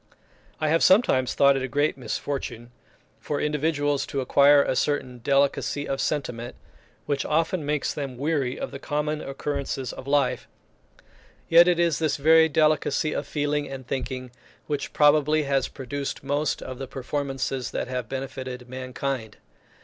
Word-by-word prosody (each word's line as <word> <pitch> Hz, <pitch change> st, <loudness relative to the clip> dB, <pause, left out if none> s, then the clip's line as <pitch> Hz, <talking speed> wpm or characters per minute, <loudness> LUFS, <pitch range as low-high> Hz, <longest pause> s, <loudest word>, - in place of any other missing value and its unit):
I 155 Hz, -, 0 dB
have 165 Hz, +2 st, +3 dB
sometimes 185 Hz, -, +4 dB
thought 140 Hz, 0 st, +5 dB
it 135 Hz, -, -1 dB
a 130 Hz, -, -2 dB
great 145 Hz, +4 st, +1 dB
misfortune 120 Hz, -1 st, -5 dB, 0.5 s
for 145 Hz, -1 st, -3 dB
individuals 145 Hz, -1 st, 0 dB
to 140 Hz, -, -3 dB
acquire 140 Hz, +2 st, +5 dB
a -, -, -1 dB
certain 130 Hz, -3 st, -1 dB
delicacy 140 Hz, +2 st, +1 dB
of 135 Hz, -, -2 dB
sentiment, 125 Hz, -5 st, -3 dB, 0.5 s
which 140 Hz, -2 st, -1 dB
often 165 Hz, +2 st, 0 dB
makes 150 Hz, 0 st, -1 dB
them 135 Hz, -4 st, -5 dB
weary 140 Hz, -2 st, -1 dB
of -, -, -4 dB
the 140 Hz, -, -7 dB
common 150 Hz, +1 st, -2 dB
occurrences 135 Hz, -1 st, -4 dB
of 130 Hz, -, -10 dB
life; 140 Hz, -2 st, +1 dB, 1.0 s
yet 170 Hz, +1 st, +8 dB
it 175 Hz, -1 st, +3 dB
is 170 Hz, -3 st, +2 dB
this 155 Hz, -3 st, 0 dB
very 160 Hz, +2 st, +5 dB
delicacy 155 Hz, -1 st, +2 dB
of 145 Hz, -, -3 dB
feeling 145 Hz, 0 st, -1 dB
and 135 Hz, -1 st, -7 dB
thinking 130 Hz, -1 st, -4 dB, 0.3 s
which 145 Hz, -2 st, -3 dB
probably 150 Hz, +1 st, +4 dB
has 140 Hz, -1 st, +1 dB
produced 140 Hz, +1 st, -5 dB
most 145 Hz, +1 st, -1 dB
of 130 Hz, 0 st, -7 dB
the 135 Hz, -, -5 dB
performances 135 Hz, -1 st, -3 dB
that -, -, -3 dB
have 125 Hz, -3 st, -4 dB
benefited 130 Hz, -2 st, -6 dB
mankind. 130 Hz, -2 st, -4 dB
140 Hz, 150 wpm, -25 LUFS, 130-150 Hz, 1.0 s, yet